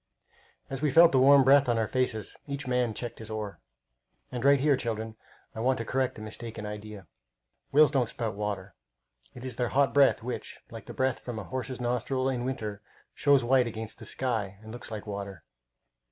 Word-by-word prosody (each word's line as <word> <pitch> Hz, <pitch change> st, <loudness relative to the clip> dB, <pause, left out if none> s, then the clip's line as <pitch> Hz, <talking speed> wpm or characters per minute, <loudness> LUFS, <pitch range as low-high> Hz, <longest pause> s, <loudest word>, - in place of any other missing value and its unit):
As 135 Hz, 0 st, -5 dB
we 150 Hz, -, +2 dB
felt 165 Hz, +4 st, +7 dB
the 130 Hz, -, +4 dB
warm 140 Hz, +1 st, +7 dB
breath 140 Hz, 0 st, +5 dB
on 120 Hz, -, +2 dB
our 110 Hz, -1 st, +1 dB
faces, 120 Hz, -5 st, -1 dB
each 140 Hz, 0 st, -4 dB
man 125 Hz, -3 st, 0 dB
checked 120 Hz, -1 st, -5 dB
his 110 Hz, -1 st, -8 dB
oar. 105 Hz, -2 st, -5 dB, 0.7 s
And 125 Hz, -1 st, -4 dB
right 140 Hz, 0 st, +6 dB
here, 145 Hz, +1 st, +4 dB
children, 115 Hz, -3 st, -4 dB, 0.4 s
I -, -, -7 dB
want 130 Hz, +3 st, +2 dB
to 115 Hz, -, -4 dB
correct 130 Hz, +1 st, -1 dB
a 110 Hz, -, -8 dB
mistaken 110 Hz, 0 st, -7 dB
idea. 105 Hz, -1 st, -7 dB, 0.7 s
Whales 150 Hz, 0 st, +6 dB
don't 130 Hz, -5 st, +1 dB
spout 115 Hz, -3 st, -3 dB
water. 100 Hz, -2 st, -4 dB, 0.6 s
It 125 Hz, +1 st, -8 dB
is 130 Hz, -, -5 dB
their 120 Hz, -2 st, 0 dB
hot 140 Hz, +1 st, +2 dB
breath 140 Hz, -5 st, +4 dB
which, 125 Hz, +1 st, -5 dB
like -, -, -9 dB
the -, -, -8 dB
breath 130 Hz, -1 st, 0 dB
from 120 Hz, -3 st, -6 dB
a 110 Hz, -, -4 dB
horse's 130 Hz, +1 st, -5 dB
nostrils 125 Hz, +2 st, 0 dB
in 125 Hz, -2 st, -2 dB
winter, 110 Hz, -6 st, -4 dB, 0.3 s
shows 140 Hz, -3 st, +4 dB
white 125 Hz, 0 st, +3 dB
against 110 Hz, -1 st, -6 dB
the -, -, -9 dB
sky 110 Hz, -7 st, -2 dB
and 110 Hz, -, -9 dB
looks 120 Hz, -, -8 dB
like 110 Hz, -2 st, -6 dB
water. 100 Hz, -5 st, -6 dB
120 Hz, 195 wpm, -28 LUFS, 110-130 Hz, 0.7 s, felt